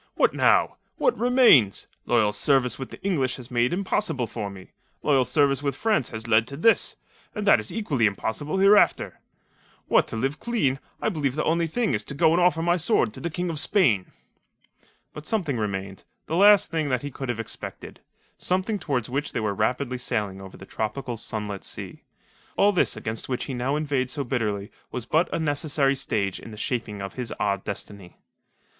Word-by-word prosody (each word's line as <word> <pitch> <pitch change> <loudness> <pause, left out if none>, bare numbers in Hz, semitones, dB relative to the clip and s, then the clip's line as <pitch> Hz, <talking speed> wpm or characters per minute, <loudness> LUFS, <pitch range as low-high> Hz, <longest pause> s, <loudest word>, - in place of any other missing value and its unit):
"What - - +3
now? - - +3 0.2
What - - +2
remains? 240 - +4 0.2
Loyal 105 -1 +3
service 125 +2 +2
with 130 - -6
the - - -11
English 140 -10 0
was 125 -1 -10
made 120 0 +2
impossible 175 - -1
for 110 -2 -5
me. 95 -1 -12 0.3
Loyal 135 -4 +3
service 140 -1 +2
with 140 -1 -1
France 215 - +1
has 110 0 -6
led 110 0 +3
to 140 - -7
this; 225 +8 +3 0.4
and 210 -2 -3
that 195 - +6
is 105 - -4
equally 145 - +1
impossible 110 - -3
hereafter. 200 +2 +4 0.7
What - - +3
to - - -6
live 135 +6 -2
clean, 145 - 0 0.2
I - - +2
believe 145 -9 -1
the 155 - 0
only 165 +1 +1
thing 230 +7 -1
is - - 0
to 140 - -5
go 160 +3 +4
and 175 - +3
offer 175 -2 +3
my 175 +1 +2
sword 210 +5 +2
to - - -6
the 170 - -3
King 175 +1 -3
of 155 - -1
Spain." 130 - +2 1.0
But 150 0 -10
something 170 - -1
remained 95 -3 -4 0.2
the 160 - -3
last 205 +2 +6
thing 160 -3 -1
that 125 -1 -1
he 145 - -5
could 135 -1 -6
have 120 -2 -2
expected 115 - -7 0.4
something 190 +3 -1
towards 135 - -2
which 140 +4 -3
they - - -1
were 105 -2 -1
rapidly 125 +4 -1
sailing 100 -5 -2
over 95 -1 -11
the 95 - -11
tropical, 115 +5 -4
sunlit 105 -3 -4
sea. - - -7 0.6
All 205 +1 +5
this 180 - +1
against 110 +3 -5
which 125 - -2
he 135 - -5
now 130 +3 -1
inveighed 140 -4 -1
so 140 +1 -2
bitterly 110 -5 -2 0.2
was 125 -3 -4
but 160 +7 +1
a - - -1
necessary 145 -3 +1
stage 105 -8 -1
in - - -11
the 105 - -10
shaping 110 -4 -3
of 100 - -6
his 125 -3 -5
odd 100 -2 0
destiny. 100 -2 -7
135 Hz, 195 wpm, -25 LUFS, 110-165 Hz, 1.0 s, that